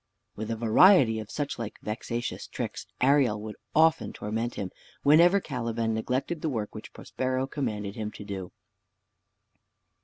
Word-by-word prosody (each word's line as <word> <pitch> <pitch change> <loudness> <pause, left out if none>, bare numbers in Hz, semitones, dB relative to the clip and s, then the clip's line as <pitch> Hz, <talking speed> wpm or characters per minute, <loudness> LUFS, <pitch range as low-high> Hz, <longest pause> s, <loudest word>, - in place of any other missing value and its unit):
With 110 +1 -5
a 115 - -1
variety 115 - +5
of 105 -1 -7
such 145 -4 -3
like 115 -2 -5
vexatious 115 +2 -4
tricks - - -5
Ariel 130 -5 +4
would 110 -1 -6 0.2
often 160 -1 +4
torment 110 +3 -3
him, 95 -2 -4 0.3
whenever 170 +7 +6
Caliban 115 -7 -2
neglected 130 +8 -2
the 160 - 0
work 110 -6 -3
which - - -9
Prospero 130 0 -2
commanded 110 -8 -3
him 110 -1 -4
to 105 - -9
do. 95 -3 -6
115 Hz, 145 wpm, -28 LUFS, 110-140 Hz, 0.3 s, whenever